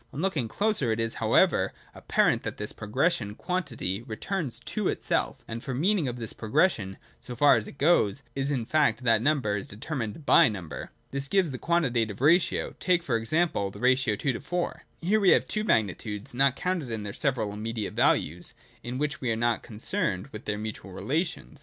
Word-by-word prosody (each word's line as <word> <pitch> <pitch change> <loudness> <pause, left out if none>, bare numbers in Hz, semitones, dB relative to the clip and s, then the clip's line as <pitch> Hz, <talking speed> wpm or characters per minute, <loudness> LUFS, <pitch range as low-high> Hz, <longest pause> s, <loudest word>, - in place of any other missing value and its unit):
On 140 - -7
looking 160 -9 0
closer, 200 - 0
it 110 - -1
is, 115 0 -1
however, - - +3 0.2
apparent - - +2
that - - -4
in - - -29
this - - -2
progression 110 -1 -1
quantity 125 - -2
returns 130 - -3
to - - -3
itself: - - -1
for 115 - -5
the 125 - -3
meaning 185 -2 +2
of 120 - -3
this 115 -3 -5
progres 150 - +3
sion, 95 - -7 0.2
so 125 - -7
far 145 +4 +6
as 110 - -1
thought - - -10
goes, 140 - +3
is 135 0 -1
the 130 -6 -1
fact 130 -4 +2
that 115 -2 +4
number 130 -6 +1
is 100 - -4
deter 115 +10 -7
mined 130 +2 -4
by 130 - +7
number. 85 -10 -6
And - - -7 0.2
this 140 0 -2
gives 185 -2 +2
the 130 - -6
quantitative 120 - 0
ratio. 165 +7 +3
Take, 180 -2 +2
for 125 -8 0
example, 115 - +1
the - - -11
ratio 130 -3 +3
2: 130 +3 -1
4. 175 0 -3 0.2
Here 200 +6 +2
we 195 -3 +4
have - - +5
two 215 - -2
magnitudes 105 - -1
(not 135 +1 +3
counted 180 -7 -2
in 110 -2 -3
their 100 -1 -5
several 120 -7 -1
immediate 110 0 -4
values) 85 +4 +1 0.3
in 120 +1 -5
which 150 +1 -2
we 125 - -1
are - - +2
only 115 0 +1
concerned 120 - -2
with 105 - -9
their 105 -1 -1
mutual 105 -3 -6
relations. 150 - -3
125 Hz, 200 wpm, -27 LUFS, 110-155 Hz, 0.3 s, by